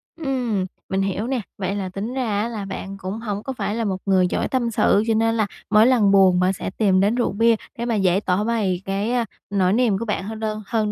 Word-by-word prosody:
Ừm, 250 - -1 0.2
mình 190 0 0
hiểu 195 +4 -2
nè. 260 -3 -1 0.2
Vậy 195 0 -2
là 195 -2 -3
tính 200 +6 -5
ra 225 -6 -1
á, 225 - -1
là 215 -4 -5
bạn 195 0 -6
cũng 195 +3 -5
hổng 210 -2 -4
có 265 - -4
phải 210 -3 -3
là 230 - -1
một 190 -2 -1
người 185 -2 +3
giỏi - - -1
tâm 240 -3 -1
sự, 210 -1 +3
cho 225 - +3
nên 225 +1 +2
là 215 - +1 0.2
mỗi 215 +2 +6
lần 225 -6 +4
buồn 190 -2 +5
mà 185 +1 +3
sẽ - - -4
tìm 190 -1 +2
đến 205 +4 +2
rượu 245 - 0
bia 225 +3 +3 0.2
để 235 - -3
mà 235 -2 0
dễ 190 -2 +2
tỏ 185 +3 +1
bày 205 -6 0
cái, 200 +4 -1
a, 245 -2 +1 0.2
nỗi 190 -2 +2
niềm 230 -4 +2
của 230 - -4
bạn 210 -2 -2
hơn 215 +2 -6
đơn 215 -1 -3
hơn, 215 -2 0
210 Hz, 260 wpm, -22 LUFS, 195-230 Hz, 0.2 s, mỗi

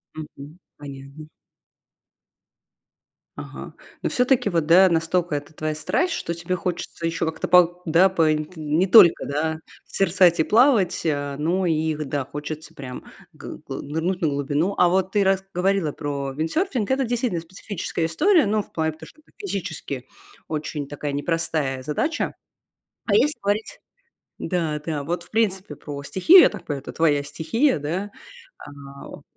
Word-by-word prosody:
Мгм. 155 +1 -10 0.2
Понятно. 140 +1 -10 2.1
Ага. - - -9 0.3
Но - - -1
всё-таки, 250 -4 +2
вот 165 -4 0
да, 185 +4 +7
настолько 165 0 0
это 145 +2 -6
твоя 155 0 -3
страсть, 345 - 0
что 170 - -3
тебе 180 +2 -3
хочется 175 -1 -4
ещё 165 0 -1
как-то 160 0 -4
по 180 0 +5
да, 170 +4 +5
по 165 -4 +2
инт 155 +4 -5
не 155 +4 0
только, 185 -4 +7
да, 160 +2 -2 0.3
созерцать 180 -2 +3
и 160 - +5
плавать, 215 - +3
э, 145 -2 -1
но 175 +5 0
и 160 -1 +1
г 150 0 -4
да, 140 0 -2
хочется 150 +3 -7
прям 125 -2 -8 0.3
гы - - -9
гы - - -5
нырнуть 160 +6 -3
на 160 - +2
глубину. 145 +7 -1
А 180 - +5
вот 185 +1 +1
ты 205 0 +2
рас 190 0 +2
говорила 185 -3 +1
про 140 -2 -4
виндсерфинг, 215 - -1
это 265 +1 +1
действительно 235 -8 -1
специфическая 175 -1 -4
история, 325 - +3
ну, 210 +1 +1
в - - -23
плане, 160 -1 -1
потому 155 - -13
что 310 - -19
это - - -29
физически 165 - -5 0.4
очень 150 -2 -4
такая 145 0 -5
непростая 145 -3 -2
задача. 300 - -2 0.7
А 205 - 0
если 280 +8 +3
говорить 205 +2 -2 0.6
да, 160 -5 -1
да, 150 -4 -3
вот, 170 +2 -3
в - - -21
принципе, 205 -4 -1
про 140 -1 -7
стихию, 315 - +6
я - - +7
так - - -10
понимаю, 145 -3 -4
это - - -9
твоя 150 -3 +2
стихия, 160 - 0
да, 175 +8 -3 0.6
эм, 140 -1 -11
165 Hz, 160 wpm, -23 LUFS, 150-190 Hz, 2.1 s, да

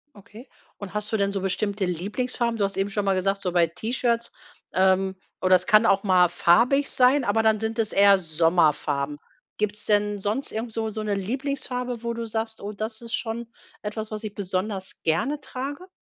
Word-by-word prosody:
Okay. 215 +5 -14 0.3
Und 200 -2 -8
hast 210 0 -3
du 220 - +1
denn 200 -1 +1
so 195 -1 -3
bestimmte 200 +1 -1
Lieblingsfarben? 230 +7 -2
Du 205 - 0
hast 195 0 -2
eben 195 +1 0
schon 205 0 -2
mal 195 - +3
gesagt: 195 +1 0
„So 185 -2 -1
bei 170 -1 +3
T-Shirts, 235 +6 -1 0.4
ähm, 190 0 +2 0.3
oh 185 - +1
das 185 -1 +4
kann 215 0 +6
auch 195 -2 +3
mal 180 -3 +4
farbig 240 +12 +3
sein, 255 +2 +4
aber 225 0 +1
dann 220 -1 +3
sind 220 +1 -3
es 220 -1 0
eher 200 0 +6
Sommerfarben.“ 155 -4 +1 0.4
Gibt‘s 210 0 -2
denn 205 -1 +2
sonst 210 +8 -2
irgend 225 +1 -4
so 220 0 -2
so 215 0 -5
‘ne 210 -1 -1
Lieblingsfarbe, 250 +2 -3
wo 235 0 -2
du 230 0 -4
sagst: 220 0 -4
„Oh 205 - -5
das 220 +2 -4
ist 235 0 -8
schon 230 0 -4 0.3
etwas, 215 +1 -5
was 215 0 -5
ich 215 -2 -5
besonders 190 0 -3
gerne 230 - 0
trage." 285 +8 -6
210 Hz, 195 wpm, -25 LUFS, 190-230 Hz, 0.4 s, kann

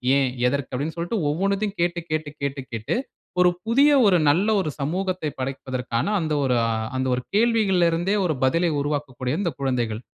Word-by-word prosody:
ஏன்? 135 -2 +2 0.2
எதற்கு?" 140 +1 -1
அப்படின்னு 145 +5 -3
சொல்ட்டு 175 +7 -2
ஒவ்வொண்ணத்தயும் 200 +5 -1
கேட்டு 175 0 0
கேட்டு 155 -1 -1
கேட்டு 140 -1 -2
கேட்டு 115 - -2 0.5
ஒரு 180 - +6 0.2
புதிய, 275 +6 +4 0.2
ஒரு 185 -3 +5
நல்ல 180 +8 +3
ஒரு 185 - -1
சமூகத்தை 180 +3 -2
படைப்பதற்கான, 130 -2 -3
அந்த 155 -3 -1
ஒரு 125 -2 +2 0.4
அந்த 130 - 0
ஒரு 125 - -3
கேள்விகள்ல 210 -6 +3
இருந்தே, 175 +5 0
ஒரு 160 -4 0
பதிலை 165 +6 +2
உருவாக்கக்கூடிய 140 -3 -3
இந்த 175 -4 0
குழந்தைகள். 120 -5 -1
155 Hz, 160 wpm, -23 LUFS, 130-185 Hz, 0.5 s, ஒரு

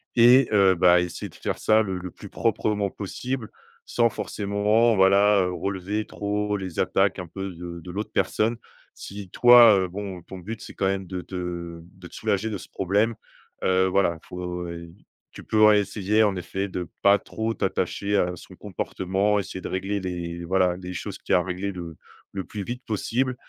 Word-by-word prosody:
et 125 +2 +7
heu, 95 -2 +5
bah, 90 0 +5
essayer 90 -1 -4
de - - -18
faire - - -4
ça 110 0 +4
le 95 -2 -3
le 90 -1 -7
plus - - -12
proprement 105 -2 0
possible. 115 +5 -5 0.4
Sans 115 -1 +2
forcément 105 +3 +1
voilà, 100 +1 +5
heu, 90 - -1
relever 100 +3 -3
trop 105 0 -2
les 95 -3 -6
attaques 95 0 +2
un 90 - -6
peu 95 +3 -5
de 85 0 -8
de 90 - -9
l'autre 105 +4 -4
personne. 115 +2 +1 0.4
Si 100 -2 -9
toi, 120 -2 +8
heu, 95 - 0
bon, 95 -1 -6
ton 95 - -10
but, 110 +5 -7
c'est - - -9
quand - - -1
même 95 -1 -2
de 90 -1 -4
te 85 -2 -6
de 90 0 -14
te - - -20
soulager 110 0 -1
de 100 - -3
ce - - -11
problème, 105 +5 +1 0.5
heu, 95 0 +3
voilà, 90 -3 +1
faut, 90 -1 -5
heu, 85 0 -8 0.4
tu - - -11
peux 110 0 +2
réessayer 105 0 +4
en 100 -2 +2
effet 95 +3 -3
de 90 -1 -5
pas 100 +1 +6
trop 110 +3 -3
t'attacher 100 0 -1
à 90 -1 +1
son - - -13
comportement. 95 +3 -1
Essayer 95 -1 -6
de - - -5
régler 95 +2 -2
les, 85 -2 -5
voilà, 90 0 +2
les 90 0 -7
choses - - -5
qu'il - - -2
y - - +7
a, - - +5
a - - -4
réglé 95 +2 -3
le 85 -3 -8 0.4
le 95 -1 -3
plus 105 -2 -6
vite 125 +5 -6
possible 125 +4 -1
95 Hz, 195 wpm, -25 LUFS, 90-105 Hz, 0.5 s, toi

